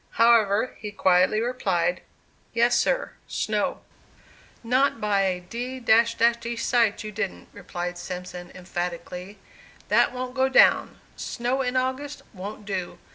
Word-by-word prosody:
However, 230 -1 +4
he 210 - -5
quietly 185 0 +3
replied, 190 -8 0 0.5
"Yes, 235 +1 +4
sir, - - +1 0.2
snow." - - -1 0.8
"Not 255 +2 +2
by 205 -2 +1
a 185 -2 0
d 245 +8 -5
d 230 0 +3
sight, 230 -3 +1
you 215 - -6
didn't," 200 -2 -4
replied 175 -2 -5
Simpson, 180 0 -7
emphatically. 180 +2 -5 0.5
"That - - +4
wont 250 0 -5
go 265 0 +2
down. 265 - +4 0.2
Snow 250 +3 -2
in 255 0 -1
August 260 +3 -2
wont 205 +2 -8
do. 190 -3 -4
220 Hz, 125 wpm, -25 LUFS, 185-245 Hz, 0.8 s, However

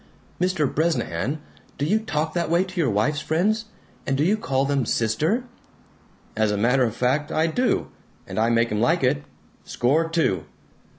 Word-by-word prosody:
"Mr. 180 -4 +2
Bresnahan, 150 - -1 0.4
do 140 - -1
you 210 +8 +2
talk 155 -7 -2
that 170 -2 -1
way 170 +2 +3
to 185 -1 -7
your 140 - +2
wife's 125 +9 +1
friends? 210 +9 0 0.4
And 135 - +1
do 145 - +2
you 195 +6 +3
call 135 -10 0
them 140 -1 +1
'sister'?" 120 - 0 0.9
"As 110 -1 +2
a 105 - 0
matter 125 +5 +3
of 115 -1 -3
fact, 140 +6 0
I 160 - +2
do! 245 +10 0 0.3
And - - -4
I 115 +1 +3
make 115 -1 +2
'em 105 0 0
like 165 +6 +2
it. 125 - +2 0.4
Score 155 +7 +1
two!" 155 - 0
150 Hz, 175 wpm, -24 LUFS, 120-170 Hz, 0.9 s, way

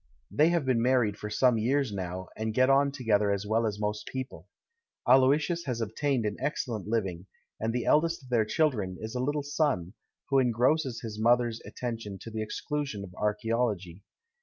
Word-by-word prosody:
They 155 +2 +4
have 170 -5 +1
been 125 -3 +2
married 120 -4 +2
for 105 - -5
some 125 +1 +3
years 130 +1 +1
now, 95 -1 -5
and 110 0 -3
get 130 +1 +4
on 140 +1 +4
together 110 -7 +1
as 100 0 -1
well 110 +2 +1
as 105 -1 -4
most 105 0 -2
people. 130 -10 -6 0.6
Aloysius 145 +7 +4
has 125 -4 -2
obtained 120 +2 -1
an 105 -1 -2
excellent 120 -8 -3
hving, 95 -5 -2 0.3
and 110 +1 -1
the 120 0 -2
eldest 165 0 +2
of 130 - -14
their 120 -3 +3
children 110 -7 0
is 110 +1 -6
a 125 - -2
little 145 +3 -1
son, 140 - 0 0.4
who 135 -1 +4
en 125 -2 +3
grosses 125 +1 +1
his 110 -2 -6
mother's 120 0 +2
attention 115 -5 -5
to 115 - -8
the 110 0 -3
exclusion 135 0 -3
of 90 -2 -10
archaeology. 105 -3 -1
115 Hz, 185 wpm, -29 LUFS, 105-135 Hz, 0.6 s, They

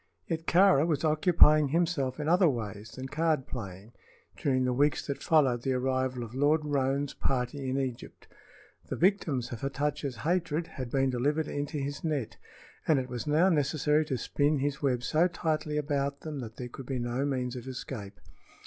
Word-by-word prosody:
Yet 165 0 -4
Kāra 175 -4 +5
was 150 -3 0
occupying 155 -1 +5
himself 155 -4 0
in 150 - -3
other 175 +1 +5
ways 110 -4 -5
than 130 - -7
card 155 -1 0
playing 100 -1 -8 0.4
during 130 -2 +1
the 125 - +1
weeks 145 +2 +1
that 140 - -4
followed 135 -7 +3
the 130 +1 0
arrival 130 -1 -1
of 115 0 -9
Lord 150 +3 +2
Roane's 140 -1 0
party 130 +1 -2
in 130 - -1
Egypt. 130 -3 -5 0.6
The - - -2
victims 165 - +1
of 120 - -6
Hatatcha's 140 0 -2
hatred 165 +1 -1
had 130 -6 -7
been 135 +1 +1
delivered 145 +5 0
into 145 +1 -3
his 140 0 -4
net, 150 -8 -2 0.5
and 155 - +4
it 130 -1 -2
was 125 +3 -5
now 160 +6 +4
necessary 150 -1 +2
to 135 -4 -2
spin 145 +4 +1
his 140 +1 -2
web 125 -4 0
so 155 +8 +3
tightly 155 -3 -2
about 140 -1 -1
them 155 -3 -5
that 115 -3 -7
there 125 - -6
could 130 +1 -10
be 135 - -2
no 120 +2 -2
means 130 -3 -2
of 125 0 -7
escape. 125 -7 -7
140 Hz, 180 wpm, -29 LUFS, 125-155 Hz, 0.6 s, Kāra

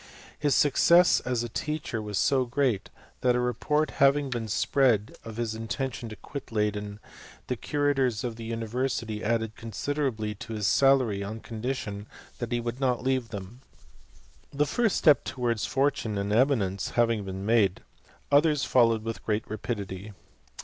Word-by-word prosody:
His 145 -3 +2
success 170 +5 +5
as 125 -2 -2
a - - -3
teacher 145 -2 -3
was 105 -2 -4
so 130 +6 +3
great, 125 -5 0 0.3
that 125 -1 +2
a - - +2
report 150 +5 0
having 140 0 +4
been 115 -2 -3
spread 115 -1 +2
of 110 -1 -8
his 115 -2 -2
intention 115 +2 -4
to 110 - -8
quit 140 +4 -8
Leyden, 105 -1 -2 0.5
the 125 - -2
curators 135 -4 0
of 120 -2 -3
the 115 - -8
university 115 -1 -2
added 115 0 0
consi 115 +5 -4
derably 110 -8 -2
to 115 - -7
his 105 -2 -2
salary 130 -4 +3
on 110 +3 -5
condition 110 -3 -5 0.3
that 120 -1 -4
he 120 - +1
would 120 +1 -4
not 125 -3 0
leave 130 -3 0
them. 105 +4 -8 0.9
This 145 0 0
first 230 -5 +2
step 150 -3 +5
towards 120 -4 -1
fortune 135 -6 0
and 100 +1 -1
eminence 110 -6 +2
having 115 -3 +2
been 95 0 -6
made, 105 -4 +2 0.5
others 145 -1 +4
followed 115 -3 +3
with 115 0 -5
great 105 0 -1
rapidity. 105 -2 -5
115 Hz, 155 wpm, -27 LUFS, 110-135 Hz, 0.9 s, success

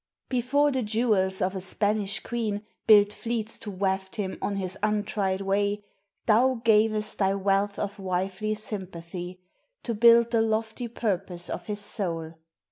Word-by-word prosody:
Before 275 +4 +2
the 260 -1 0
jewels 210 -4 +1
of 185 +1 -1
a 190 - -3
Spanish 205 +1 0
queen 215 -4 -3 0.2
Built 205 -1 +7
fleets 230 -1 -3
to 225 - -7
waft 190 0 -2
him 195 -4 -4
on 205 - -1
his 190 -1 -2
untried 205 -2 0
way, 200 +1 0 0.4
Thou 245 +3 +4
gavest 215 -1 +2
thy 195 -1 +2
wealth 200 +1 +1
of 205 0 -4
wifely 190 +3 -2
sympathy 185 -3 -5 0.4
To 235 - -2
build 235 +1 +6
the 230 -2 +3
lofty 220 +2 -1
purpose 190 -6 -3
of - - -5
his 210 -1 -4
soul. 165 -6 -2
205 Hz, 145 wpm, -27 LUFS, 190-220 Hz, 0.4 s, Built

